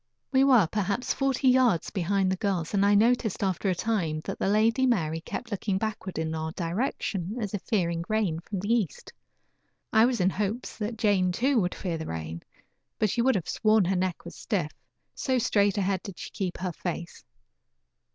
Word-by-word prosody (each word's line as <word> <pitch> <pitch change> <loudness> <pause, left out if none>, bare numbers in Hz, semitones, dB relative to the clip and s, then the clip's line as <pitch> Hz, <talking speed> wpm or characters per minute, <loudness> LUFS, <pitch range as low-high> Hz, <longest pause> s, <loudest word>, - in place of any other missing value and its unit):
We 265 -1 +4
were 255 -8 +6
perhaps 200 +6 -1
forty 270 -1 0
yards 250 -9 +3
behind 190 0 +1
the - - +1
girls, 185 -5 -1
and 200 -1 +3
I 205 0 +5
noticed 225 -1 +2
after 190 +1 0
a 185 - +1
time 170 -7 -1
that - - -5
the - - 0
Lady 225 +6 +3
Mary 165 -9 0
kept 235 +7 -6
looking 200 -1 -1
backward 200 -3 -4
in 160 0 -2
our 160 0 -3
direction, 190 +1 -2
as 210 -3 -3
if 205 - -2
fearing 170 -5 0
rain 210 -7 0
from 185 +2 -5
the 205 +4 +1
east. 210 - -2 0.8
I 220 +1 +6
was 245 -2 0
in 185 +1 +3
hopes 210 +5 -3
that 220 +2 -3
Jane, 200 -5 +2
too, 245 +5 +2
would 180 -1 -1
fear 170 -4 -3
the 160 - -5
rain, 80 0 -5 0.6
but 215 -3 +1
you 235 - +2
would 265 - +4
have 180 - -2
sworn 215 -3 +3
her 190 +2 +1
neck 185 -2 -2
was 170 - -9
stiff, 175 -8 -2 0.4
so 260 -1 0
straight 205 -4 +2
ahead 190 -1 0
did 195 -3 -9
she - - -7
keep 190 -4 -3
her 185 -1 -3
face. 170 0 -6
200 Hz, 195 wpm, -27 LUFS, 175-220 Hz, 0.8 s, were